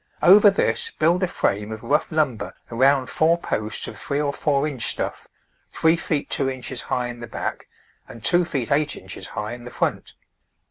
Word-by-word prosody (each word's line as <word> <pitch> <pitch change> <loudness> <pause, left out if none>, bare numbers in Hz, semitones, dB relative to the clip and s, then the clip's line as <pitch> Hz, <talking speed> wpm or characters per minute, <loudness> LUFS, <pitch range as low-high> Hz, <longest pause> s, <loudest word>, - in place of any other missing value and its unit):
Over 205 +3 +8
this 455 - 0
build 170 +4 +3
a 185 - +2
frame 105 - -1
of 110 0 -7
rough 150 +4 +1
lumber 150 -8 -1 0.2
around 130 +3 +3
four 160 +5 +2
posts 110 -10 -3
of - - -8
three 140 0 -2
or 145 -1 0
four 145 0 +1
inch 135 -6 -3
stuff, - - -3 0.4
three 160 +1 +3
feet 155 -3 -2
two 135 -1 0
inches 130 -1 -5
high 125 - -1
in 120 0 -8
the 120 - -7
back, - - -5 0.4
and 115 - -12
two 175 0 +4
feet 135 -8 -3
eight 150 +1 +2
inches - - -9
high 105 +2 -5
in 120 0 -9
the 125 - -8
front. - - -2
140 Hz, 190 wpm, -23 LUFS, 120-160 Hz, 0.4 s, Over